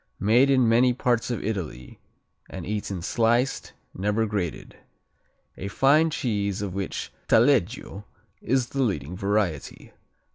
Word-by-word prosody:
Made 120 +7 +4
in 130 -3 +4
many 120 +2 +4
parts 120 -1 0
of 120 -4 -3
Italy 90 - -5 0.5
and - - -7
eaten 100 -4 -4
sliced, 120 +6 0 0.2
never 105 +4 0
grated. 100 -7 -4 0.8
A 100 - -5
fine 140 - +3
cheese 105 -8 -2
of 95 -3 -4
which 95 -1 -4 0.2
Taleggio 115 -4 +2 0.4
is 130 0 0
the 135 - -2
leading 95 - -1
variety. 100 -6 -2
110 Hz, 120 wpm, -25 LUFS, 100-125 Hz, 0.8 s, Made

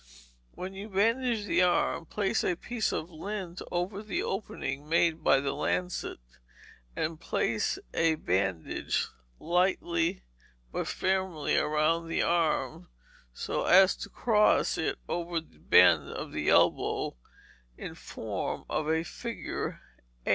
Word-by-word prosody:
When 185 +1 -6
you 200 +3 -7
bandage 225 +2 +1
the 185 - +2
arm, 175 -2 +2
place 200 +2 0
a 180 - +1
piece 230 +4 -2
of 165 +3 -3
lint 180 +1 -5
over 180 +3 -2
the 215 -1 -2
opening 150 -7 -4
made 165 -1 +2
by 135 - +5
the 135 0 -1
lancet, 180 +4 -2 0.8
and 155 0 -2
pass 110 -2 0 0.2
a 165 -1 +3
bandage 95 - -1 0.3
lightly 175 0 +1 0.5
but - - -2
firmly 185 -5 0
around 155 +2 +2
the 165 - 0
arm, 155 - 0 0.4
so - - -3
as 190 0 +7
to - - -7
cross 210 -3 +3
it 160 - -1
over 170 -1 -1
the 120 - -18
bend - - +5
of - - -6
the - - -1
elbow, - - +3 0.6
in - - -6
form - - -5
of 155 0 -1
a 160 +1 +2
figure 235 +6 -5 0.4
8. - - -2
170 Hz, 130 wpm, -29 LUFS, 155-195 Hz, 0.8 s, as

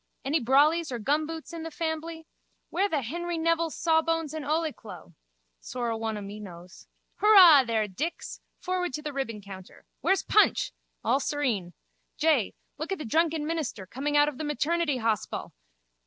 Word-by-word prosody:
Any 295 +4 +2
brollies 300 +5 +3
or 245 - -2
gumboots 310 +7 -2
in 335 - -5
the 325 - -5
fambly? 320 0 -4 0.5
Where 395 +3 +1
the 295 -6 -1
Henry 345 +7 -3
Nevil's 330 0 0
sawbones 325 -1 +1
and 315 -1 -4
ole 310 +1 0
clo? 180 -4 -12 0.5
Sorra 240 - -3
one 225 -1 -3
o' - - -6
me 200 +1 -8
knows. 180 -3 -12 0.3
Hurrah 365 -10 +8
there, 220 -2 0
Dix! 290 - -5 0.2
Forward 360 -4 -2
to 300 - -4
the 300 -2 -4
ribbon 230 -6 -4
counter. 190 -2 -12
Where's 385 - +1
Punch? 425 - +3 0.3
All 270 - +2
serene. 250 -12 -1 0.4
Jay, 305 -9 +2 0.2
look 315 +5 -4
at 385 - -1
the 310 - -6
drunken 320 +4 +1
minister 305 - -3
coming 285 +8 -1
out 290 0 +5
of 295 -3 -4
the - - -3
maternity 300 0 0
hospal! 225 -3 -2
295 Hz, 165 wpm, -27 LUFS, 230-330 Hz, 0.5 s, Hurrah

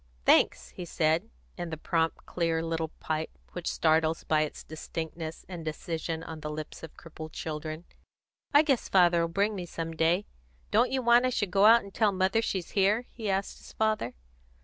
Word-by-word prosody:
"Thanks!" - - +4
he 180 - -8
said, 165 +4 +1 0.3
in 175 -1 -3
the 160 - -4
prompt, 165 +1 -1
clear 165 -2 0
little 165 -1 -1
pipe 155 0 -3
which 175 -1 -3
startles 160 0 +2
by 155 -1 +2
its 155 - -3
distinctness 160 +1 -6
and 175 -3 -7
decision 160 +1 -4
on 160 -1 -7
the 150 0 -5
lips 155 0 -6
of 160 - -10
crippled 160 -1 -9
children. 155 +1 -5 0.7
"I 290 0 +7
guess 275 -6 +1
father'll 175 -3 +4
bring 200 +6 +1
me 180 -3 -5
some 165 -1 -4
day. 170 +5 +2 0.5
Don't 250 - +4
you 265 -1 -1
want 240 +1 +5
I - - +2
should 205 -6 -1
go 195 +2 +4
out 230 +1 +7
and 200 - -12
tell 215 -2 +3
mother 190 +3 +2
she's 190 -6 -3
here?" 205 +4 +2
he 220 -4 -4
asked 195 0 -1
his - - -14
father. 215 - 0
170 Hz, 185 wpm, -29 LUFS, 160-200 Hz, 0.7 s, I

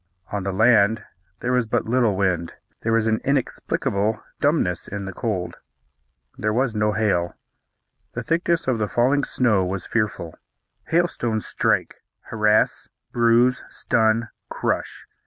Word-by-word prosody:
On 100 - -2
the 95 +1 -2
land 110 +1 +3 0.4
there 125 - -1
was 125 -2 +1
but - - 0
little 115 -4 +2
wind. 90 -4 0 0.3
There 115 - -1
was 115 -1 +2
an 110 0 +1
inexplicable 110 -5 -1 0.2
dumbness 140 - +1
in 100 -1 -5
the 95 - -6
cold. 95 -5 -3 0.8
There 110 - 0
was 125 +1 +1
no 105 0 +1
hail. 100 -6 0 0.8
The - - -4
thickness 165 -1 0
of 125 -4 +1
the 105 - 0
falling 130 +7 +2
snow 115 -9 +2
was 90 0 -3
fearful. 105 -7 -2 0.5
Hailstones 140 -10 0
strike, - - 0 0.2
harass, 105 -1 +1 0.2
bruise, 120 +2 +3
stun, 115 0 +1 0.2
crush. - - -3
110 Hz, 135 wpm, -23 LUFS, 100-125 Hz, 0.8 s, land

